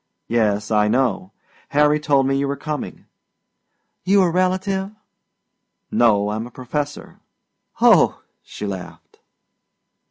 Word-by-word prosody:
"Yes, 105 Hz, -2 st, 0 dB
I 105 Hz, -1 st, +3 dB
know. 120 Hz, -5 st, 0 dB, 0.4 s
Harry 150 Hz, +1 st, +3 dB
told 140 Hz, -3 st, +2 dB
me 135 Hz, 0 st, +1 dB
you 140 Hz, 0 st, 0 dB
were 140 Hz, -, -2 dB
coming." 150 Hz, +2 st, -6 dB, 1.0 s
"You 195 Hz, +1 st, +4 dB
a 175 Hz, -, +1 dB
relative?" 190 Hz, +2 st, 0 dB, 1.0 s
"No, 105 Hz, -3 st, +3 dB
I'm 110 Hz, +2 st, -4 dB
a -, -, -12 dB
professor." 145 Hz, +4 st, -6 dB, 0.6 s
"Oh," -, -, +4 dB, 0.2 s
she 105 Hz, -, -8 dB
laughed. 95 Hz, -3 st, -8 dB
135 Hz, 115 wpm, -21 LUFS, 105-150 Hz, 1.0 s, You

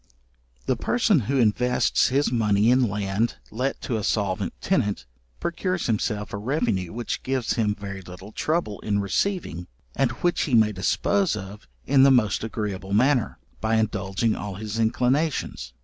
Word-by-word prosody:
The -, -, +1 dB
person 225 Hz, -7 st, +2 dB
who 135 Hz, +4 st, -1 dB
invests 120 Hz, -1 st, +2 dB
his 140 Hz, +1 st, +1 dB
money 110 Hz, -1 st, +3 dB
in 125 Hz, -2 st, +3 dB
land 100 Hz, +3 st, -1 dB, 0.2 s
let 130 Hz, +4 st, -2 dB
to 115 Hz, -, -2 dB
a 105 Hz, -, -3 dB
solvent 100 Hz, -3 st, -1 dB
tenant, 105 Hz, -, 0 dB, 0.3 s
procures 185 Hz, -, -2 dB
himself 105 Hz, -2 st, -1 dB
a -, -, -2 dB
revenue 105 Hz, -, -1 dB
which 120 Hz, +1 st, -4 dB
gives 130 Hz, -3 st, -1 dB
him 105 Hz, -3 st, 0 dB
very 100 Hz, -2 st, -7 dB
little 90 Hz, +3 st, -11 dB
trouble 155 Hz, -6 st, -1 dB
in 105 Hz, -1 st, -1 dB
receiving, 100 Hz, -, -1 dB, 0.3 s
and 135 Hz, -, +2 dB
which 175 Hz, 0 st, +2 dB
he 130 Hz, -, +1 dB
may 110 Hz, -2 st, +5 dB
dispose 110 Hz, -, +1 dB
of 100 Hz, -4 st, -8 dB, 0.2 s
in 135 Hz, -, +4 dB
the 135 Hz, -, +7 dB
most 110 Hz, -7 st, +3 dB
agreeable 100 Hz, -3 st, -4 dB
manner, 125 Hz, +2 st, +2 dB, 0.2 s
by 110 Hz, +1 st, +1 dB
indulging 105 Hz, 0 st, 0 dB
all 100 Hz, -2 st, -5 dB
his 110 Hz, +2 st, -5 dB
inclinations. 125 Hz, -, 0 dB
110 Hz, 155 wpm, -25 LUFS, 100-130 Hz, 0.3 s, the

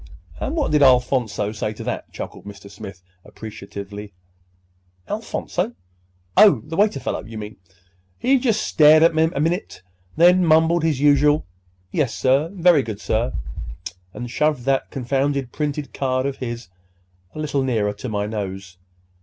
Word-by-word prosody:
'" -, -, -21 dB
"And -, -, -2 dB
what 305 Hz, -, 0 dB
did—Alphonso 125 Hz, -7 st, +3 dB
say 105 Hz, 0 st, -3 dB
to -, -, -8 dB
that?" -, -, -5 dB
chuckled -, -, -8 dB
Mr. 100 Hz, -1 st, -11 dB
Smith 95 Hz, -2 st, -10 dB, 0.2 s
appreciatively. 100 Hz, -1 st, -9 dB, 0.9 s
"Alphonso? -, -, -3 dB, 0.6 s
Oh, 165 Hz, -, +6 dB
the 160 Hz, -, -6 dB
waiter 205 Hz, -6 st, +2 dB
fellow, -, -, -3 dB
you 110 Hz, +1 st, -9 dB
mean? 105 Hz, 0 st, -8 dB
Oh, 95 Hz, +1 st, -35 dB, 0.5 s
he 265 Hz, +1 st, +3 dB
just 230 Hz, -4 st, +1 dB
stared 155 Hz, 0 st, +6 dB
a 165 Hz, -, +6 dB
minute, 160 Hz, -, 0 dB, 0.3 s
then 180 Hz, +2 st, +6 dB
mumbled 165 Hz, +1 st, +4 dB
his 155 Hz, -4 st, 0 dB
usual 145 Hz, +1 st, +4 dB, 0.5 s
'Yes, 140 Hz, -6 st, 0 dB
sir, 135 Hz, +5 st, +2 dB
very 175 Hz, -5 st, +4 dB
good, 110 Hz, -5 st, -6 dB
sir,' 115 Hz, +3 st, -1 dB, 0.8 s
and 120 Hz, +3 st, -7 dB
shoved 150 Hz, -2 st, 0 dB
that 135 Hz, +1 st, 0 dB
confounded 135 Hz, 0 st, -1 dB
printed 150 Hz, -1 st, -3 dB
card 130 Hz, -1 st, -1 dB
of 140 Hz, -1 st, -2 dB
his 120 Hz, -4 st, -6 dB, 0.7 s
a -, -, -6 dB
little 150 Hz, -2 st, -1 dB
nearer 110 Hz, -6 st, 0 dB
to 105 Hz, +5 st, -7 dB
my 105 Hz, -1 st, -1 dB
nose. 95 Hz, -3 st, -6 dB
135 Hz, 145 wpm, -22 LUFS, 110-155 Hz, 0.9 s, Oh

